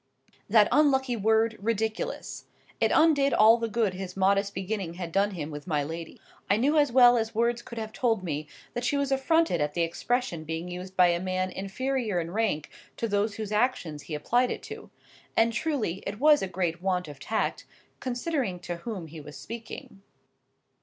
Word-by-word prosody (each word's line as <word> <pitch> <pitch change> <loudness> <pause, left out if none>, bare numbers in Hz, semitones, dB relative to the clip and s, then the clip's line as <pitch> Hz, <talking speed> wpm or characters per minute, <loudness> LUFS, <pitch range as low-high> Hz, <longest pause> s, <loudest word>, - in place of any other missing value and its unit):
That 210 0 +6
unlucky 265 -4 +3
word 220 +1 +2
"ridiculous!" 220 +1 -3 0.3
It - - +2
undid 285 -5 +4
all 220 +2 +7
the 230 - -1
good 220 -4 +1
his 185 0 -7
modest 200 +1 +2
beginning 190 -3 -3
had 175 -2 -5
done 200 +3 +2
him 155 -2 -5
with 145 +2 -8
my 150 -4 +1
lady. 165 +2 -7 0.3
I 200 - +4
knew 280 +7 +2
as 290 -4 +4
well 245 -1 +7
as 225 0 -3
words 235 +1 +1
could 235 - -10
have 220 -1 -5
told 225 -6 0
me, 155 -3 -3 0.3
that 240 - -3
she 285 +3 +1
was 280 -1 -1
affronted 270 - +2
at 150 0 -1
the 170 - +2
expression 175 +1 -1
being 160 +2 -4
used 185 +1 -8
by 180 -1 +6
a 170 0 +1
man 185 0 -1
inferior 215 +1 -2
in 165 0 -4
rank 205 -8 -1 0.3
to 230 - -1
those 205 0 0
whose 215 -2 -5
actions 210 - 0
he 155 - -6
applied 245 +11 +1
it - - -4
to,—and 230 +1 -3
truly, 225 - -1
it 205 - -5
was 300 +1 +6
a 195 - -1
great 175 -2 -2
want 180 -2 0
of 145 -2 -10
tact, 220 - -2 0.3
considering 250 - -2
to 175 -1 -5
whom 190 -1 -6
he 160 0 -10
was 150 0 -10
speaking. 225 -3 -9
210 Hz, 185 wpm, -27 LUFS, 175-240 Hz, 0.3 s, all